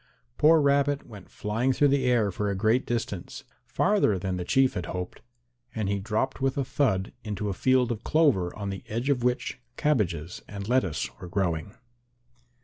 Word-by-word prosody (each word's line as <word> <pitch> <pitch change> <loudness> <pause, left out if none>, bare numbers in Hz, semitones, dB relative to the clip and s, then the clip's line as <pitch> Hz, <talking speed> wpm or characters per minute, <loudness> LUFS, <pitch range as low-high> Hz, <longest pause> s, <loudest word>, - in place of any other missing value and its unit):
Poor 160 +1 +6
Rabbit 140 0 +2
went 105 -5 -12
flying 115 +5 -1
through 145 +3 +3
the 135 -1 +2
air 120 -5 +3
for 105 +3 -2
a 100 - -1
great 110 +6 +2
distance, 110 -6 -4 0.2
farther 195 - +2
than 95 0 -2
the 90 - -3
Chief 130 +7 +3
had 90 - -4
hoped, 90 0 -5 0.5
and 110 -3 -1
he 100 0 0
dropped 110 +7 -2
with 135 0 0
a 135 - 0
thud 110 -9 0
into 105 -1 -3
a - - -1
field 125 +4 +2
of 115 -1 -4
clover 135 - +2
on 100 -2 -4
the 95 - -7
edge 120 +6 -1
of 130 -3 +1
which 125 +1 -1 0.2
cabbages 90 - 0
and 100 -1 -7
lettuce 110 -10 +1
were 90 - -8
growing. 90 +2 -2
110 Hz, 180 wpm, -27 LUFS, 95-130 Hz, 0.5 s, Poor